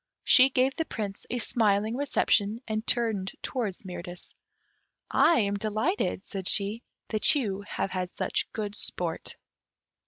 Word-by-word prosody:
She 260 +1 +7
gave 260 +1 +2
the 325 - -2
Prince 205 -7 -5
a 245 - -1
smiling 215 -1 +1
reception, 230 -6 +1
and 220 0 -3
turning 225 -6 0 0.2
towards 215 -7 -3
Mirtis, 180 -1 -8 0.8
"I 335 - +5
am 200 -1 0
delighted," 215 - -1
said 190 -3 -5
she, 210 +2 +1 0.3
"that 215 +6 +4
you 205 -8 -1
have 195 - -3
had 185 -1 -3
such - - -1
good 210 -2 -4
sport." 175 -5 -3
215 Hz, 135 wpm, -28 LUFS, 195-235 Hz, 0.8 s, She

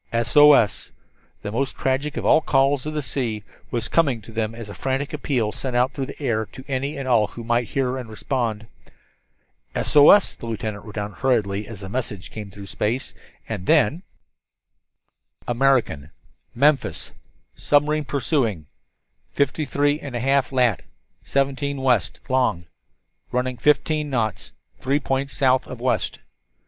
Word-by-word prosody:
"SOS" 115 -2 +5 0.5
the 105 - -4
most 135 +5 -1
tragic 140 +3 -1
of - - -3
all - - +5
the - - -26
calls 135 +1 +2
of 155 - -4
the 150 - -1
sea, 115 -5 -3 0.3
was 115 -2 -2
coming 140 -4 +2
to 115 - -12
them 110 0 -2
as 115 -2 -8
a 100 - -8
frantic 135 +5 -2
appeal 130 -7 -1
sent 130 +2 -4
out 125 +1 +2
through 135 -2 -3
the - - -10
air 115 -6 -1
to 130 - -12
any 140 +2 -2
and 135 -1 -5
all 115 -4 +3
who 115 - -9
might 120 0 0
hear 130 +1 -1
and 120 -3 -8
respond. 110 0 -2 1.1
"SOS," 150 +7 +6
the 115 - -9
lieutenant 110 -2 -4
wrote 105 - -10
down 105 -1 -3
hurriedly 105 -6 0
as 110 -3 -9
the 95 - -6
message 105 -3 -5
came 105 -2 -7
through 100 0 -10
space. 110 +6 -2 0.3
And 100 -5 -5
then: 150 +12 +3 1.5
"American 120 - +1 0.5
Memphis 140 +2 +1 0.4
submarine 150 +1 +1
pursuing 125 - -1 0.7
53 145 +1 +1
1/2 135 0 0
lat. 125 -6 +2 0.4
17 140 +1 -1
W. 130 -4 +3 0.3
lon. 130 -10 +1 0.7
running 125 0 -1
fifteen 150 +2 +2
knots 115 -6 -2 0.3
three 140 +3 +1
points 135 0 -2
south 130 -2 +3
of - - -8
west." - - -1
130 Hz, 145 wpm, -23 LUFS, 110-140 Hz, 1.5 s, SOS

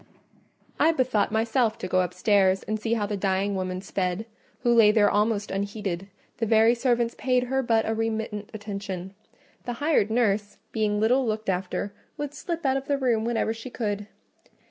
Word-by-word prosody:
I 325 - +5
bethought 250 -9 +1
myself 225 +1 +1
to - - -5
go 185 0 +2
upstairs 190 +1 +2
and 215 0 -2
see 225 +2 -1
how 210 -3 0
the 205 0 -2
dying 195 +1 0
woman 185 -1 -3
sped, 190 +1 -2 0.4
who 240 -1 +3
lay 225 -3 +7
there 210 -1 +4
almost 210 0 +1
unheeded: 195 -2 -3 0.3
the 225 - -1
very 225 +1 +5
servants 240 -1 +1
paid 250 -1 +2
her 265 +2 0
but 230 -3 +1
a 220 - +1
remittent 220 -2 -3
attention: 200 -3 -6 0.5
the 245 - -2
hired 285 -5 +2
nurse, 215 -3 +1
being 210 -2 0
little 245 +5 +3
looked 215 -1 -2
after, 190 +2 -2 0.2
would 290 -1 -4
slip 335 +1 -5
out 265 0 +3
of 270 0 -6
the 285 - +1
room 240 -5 +1
whenever 230 -1 0
she 230 +3 -8
could. 205 -4 -3
220 Hz, 175 wpm, -26 LUFS, 200-235 Hz, 0.5 s, lay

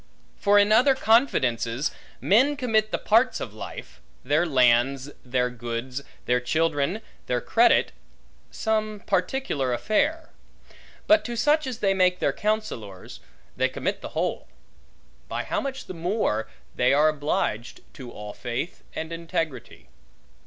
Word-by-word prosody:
For 205 0 +3
in 205 +1 +5
other 260 +5 +5
confidences, 135 - +2 0.3
men 265 +9 +3
commit 220 -5 +1
the - - -1
parts 235 +4 +2
of 110 - -6
life; 65 - -9 0.2
their 150 +6 +2
lands, 130 0 +3
their 125 0 0
goods, 120 +2 -5 0.2
their 125 0 +2
children, 160 - 0 0.3
their 125 - 0
credit, - - +3 0.6
some 215 -1 -2
particular 180 - -1
affair; 305 - 0 0.7
but 320 0 +5
to 240 - -4
such 295 +5 +2
as 250 -2 -5
they 195 -1 +3
make 185 -1 +3
their - - 0
counsellors, 210 - -4 0.4
they - - +1
commit - - -3
the - - -9
whole: - - -2 0.8
by 120 +1 -3
how - - -2
much 270 -1 -5
the - - -7
more, 170 - -1 0.3
they 125 +2 +3
are 150 +2 +5
obliged 140 -6 -2
to 130 -4 -9
all 105 0 -8
faith 120 +8 -5
and 160 +1 -4
integrity. 165 -7 -4
165 Hz, 135 wpm, -25 LUFS, -, 0.8 s, in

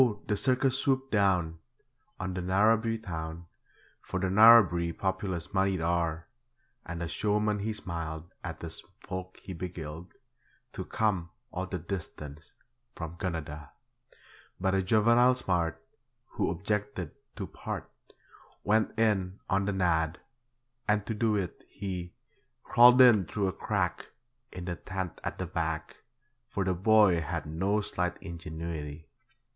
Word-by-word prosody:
the 105 - 0
circus 130 +3 +2
swooped 135 -1 +1
down 90 -6 +2 0.6
On 95 0 -3
the 90 - -3
Narrabri 110 +5 +3
town, 80 -2 -5 0.6
For 95 - -4
the 95 0 0
Narrabri 95 -5 +7
populace 95 -3 -2
moneyed 95 -1 +2
are; 85 -1 0 0.6
And 85 0 -5
the 85 - -2
showman 105 +4 0
he 110 +2 -1
smiled 85 -4 -5
At 90 -2 -6
the 80 -1 -5 0.2
folk 95 -3 -6
he 95 - -6
beguiled 85 -1 -7 0.6
To - - -5
come 95 -6 0 0.2
all 95 +1 -3
the 90 - -3
distance 80 -4 -7 0.4
from 80 0 -6
Gunnedah. 75 -5 -4 0.9
But 95 +1 +1
a 95 - +3
juvenile 115 +6 +5
smart, 85 -8 0 0.5
Who - - -1
objected 105 +4 -2 0.2
to 100 - -4
'part', - - -6 0.8
Went 110 +1 +2
in 100 -4 +1
'on 100 0 +2
the 100 - 0
nod', 85 -3 +1 0.7
and 105 -1 +2
to 115 - -2
do 110 0 +1
it 95 -4 -3
he 90 -3 -5 0.5
Crawled 125 +1 +7
in 110 -7 +7
through 100 +1 0
a - - -4
crack - - -1 0.4
In 90 -1 -7
the 90 -2 -3
tent 95 -2 -5
at - - -3
the - - -3
back, - - -3 0.5
For 100 - -1
the 95 -1 +1
boy 100 -2 +5
had 80 0 -3
no 95 +7 0
slight 90 -3 -2
ingenuity. 80 -2 -6
95 Hz, 135 wpm, -30 LUFS, 85-105 Hz, 0.9 s, Narrabri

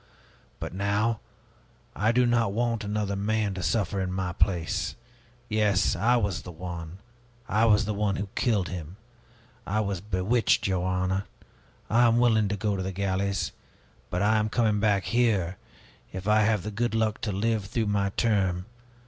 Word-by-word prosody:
But - - -5
now 100 +4 0 0.8
I 105 +3 +2
do 125 +1 +3
not 115 -4 +2
want 115 0 0
another 105 -1 -1
man 105 0 0
to 95 - -5
suffer 100 0 0
in 90 -1 -2
my 90 -1 -2
place. 85 -2 0 0.5
Yes, 105 -5 +2
I 115 +8 +3
was 100 -6 -1
the 90 - -9
one, 85 0 -7 0.5
I 110 +3 +3
was 105 -2 +4
the 105 - -1
one 100 -1 0
who 100 +1 -3
killed 105 -9 +1
him! 90 0 -7 0.7
I 105 - 0
was 100 -4 -2
bewitched, 105 +3 +1
your 95 -2 0
honor! 95 +1 0 0.6
I 120 +2 +4
am 115 0 +3
willing 110 -3 +4
to 105 +1 -2
go 105 0 0
to 95 - -3
the 95 +1 -3
galleys. 95 -1 -1 0.6
But 90 +3 -1
I 110 +1 +4
am 110 0 +1
coming 110 -2 +2
back 100 -2 +2
here, 105 -7 +1 0.5
if 95 +2 -6
I 105 0 +5
have 105 -3 +2
the 105 - -4
good 120 +2 -1
luck 110 -1 0
to 105 - -1
live 105 +1 0
through 110 +3 -1
my 100 -1 +1
term. 95 -6 +1
100 Hz, 175 wpm, -27 LUFS, 95-110 Hz, 0.8 s, I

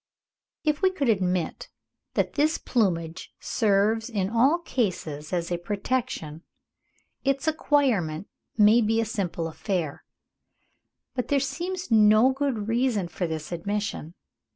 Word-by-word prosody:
If 300 0 0
we 380 - +5
could 295 -9 -1
admit 185 -5 0 0.5
that - - 0
this 305 +2 +2
plumage 175 -7 -1
serves 220 +2 +1
in 200 -4 -1
all 260 +8 +4
cases 180 - -3
as 175 -1 -2
a 175 - -1
protection, 195 -5 -3 0.8
its 275 +2 0
acquirement 245 - +1 0.3
would 215 +1 +5
be 225 +1 +2
a 225 - +1
simple 180 -6 -2
affair; 165 -2 -3 1.1
but 250 -2 -2
there 285 - +2
seems 345 +6 -4
no 215 +3 +6
good 265 -6 -2
reason 230 -6 +1
for 175 0 -3
this 160 0 -5
admission. 195 -1 -3
215 Hz, 125 wpm, -26 LUFS, 175-265 Hz, 1.1 s, no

